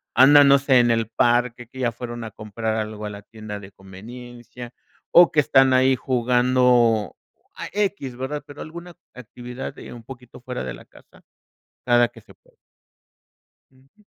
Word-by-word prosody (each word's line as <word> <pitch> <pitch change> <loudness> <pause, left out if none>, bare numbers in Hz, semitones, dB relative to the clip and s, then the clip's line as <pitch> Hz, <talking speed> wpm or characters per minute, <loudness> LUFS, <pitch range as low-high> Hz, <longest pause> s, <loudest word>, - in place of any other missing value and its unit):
andan, 140 +3 +7
no 140 - +7
sé, 135 -2 +3
en 120 -1 +3
el 115 -1 0
parque, 120 +1 0
que 130 +2 -13
ya 120 -2 0
fueron 120 0 -7
a 110 - -8
comprar 110 +1 -4
algo 110 -1 -5
a - - -4
la 100 0 -9
tienda 110 -1 -9
de 100 0 -13
conveniencia 120 +5 -12 0.4
o 175 0 +7
que 150 - +2
están 135 -2 +4
ahí 130 +1 +4
jugando 125 -3 +2 0.4
a - - -7
equis, 195 -11 -2
¿verdad?, 140 +2 -5
pero 145 - -12
alguna 170 +2 -10 0.2
actividad, 125 +2 -9
eh, - - -10
un 120 -1 -12
poquito 125 -1 -13
fuera 125 - -6
de 65 -2 -5
la - - -15
casa, - - -21 0.7
cada 120 -1 +4
que 115 -1 -17
se - - -19
puede. - - -31 1.2
Ujú. 135 +11 -27
120 Hz, 170 wpm, -22 LUFS, 115-130 Hz, 1.2 s, andan